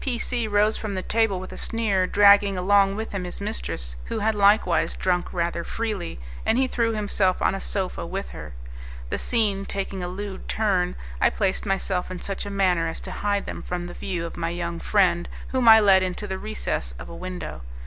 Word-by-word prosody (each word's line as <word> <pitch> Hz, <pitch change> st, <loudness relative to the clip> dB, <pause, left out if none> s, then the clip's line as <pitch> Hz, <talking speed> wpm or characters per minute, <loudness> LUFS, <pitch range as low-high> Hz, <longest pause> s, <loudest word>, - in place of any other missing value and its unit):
P 255 Hz, -3 st, -1 dB
C 240 Hz, -1 st, -1 dB
rose 210 Hz, +1 st, +2 dB
from 210 Hz, -3 st, -4 dB
the 185 Hz, -, -3 dB
table 225 Hz, -4 st, +1 dB
with 185 Hz, -, -8 dB
a -, -, -8 dB
sneer, 205 Hz, -5 st, +1 dB
dragging 200 Hz, -1 st, +6 dB
along 195 Hz, +1 st, +4 dB
with 220 Hz, +1 st, -4 dB
him 200 Hz, -2 st, -3 dB
his 180 Hz, -, -5 dB
mistress, -, -, -4 dB
who -, -, -3 dB
had 220 Hz, +1 st, +1 dB
likewise 200 Hz, -5 st, +3 dB
drunk 180 Hz, -1 st, 0 dB
rather 170 Hz, -1 st, -1 dB
freely, 210 Hz, -, -4 dB, 0.2 s
and 225 Hz, -, +2 dB
he 265 Hz, -, +3 dB
threw 235 Hz, -3 st, 0 dB
himself 200 Hz, -3 st, +1 dB
on -, -, +2 dB
a 195 Hz, -, -4 dB
sofa 190 Hz, -3 st, -2 dB
with 190 Hz, +4 st, -4 dB
her. -, -, -9 dB, 0.6 s
The -, -, -1 dB
scene 210 Hz, -5 st, +1 dB
taking 195 Hz, -1 st, -4 dB
a 175 Hz, -, -3 dB
lewd 190 Hz, +1 st, -6 dB
turn, 185 Hz, -5 st, +1 dB, 0.3 s
I -, -, +6 dB
placed 195 Hz, +1 st, -1 dB
myself 190 Hz, -1 st, -1 dB
in 185 Hz, -1 st, -6 dB
such 195 Hz, +2 st, -4 dB
a -, -, -4 dB
manner 185 Hz, -4 st, +2 dB
as 165 Hz, -, -4 dB
to 185 Hz, -, -7 dB
hide 200 Hz, +1 st, -1 dB
them -, -, -6 dB
from 175 Hz, -1 st, -3 dB
the 175 Hz, -, -7 dB
view 175 Hz, -3 st, -3 dB
of 165 Hz, -, -7 dB
my 165 Hz, -1 st, -1 dB
young 170 Hz, 0 st, -3 dB
friend, 175 Hz, -4 st, +2 dB, 0.2 s
whom 255 Hz, -2 st, +1 dB
I 220 Hz, 0 st, +10 dB
led 195 Hz, -3 st, +6 dB
into 185 Hz, +2 st, -2 dB
the 190 Hz, -2 st, -4 dB
recess 135 Hz, -, -3 dB
of -, -, -9 dB
a -, -, -9 dB
window. 185 Hz, -, -6 dB
195 Hz, 210 wpm, -24 LUFS, 180-210 Hz, 0.6 s, I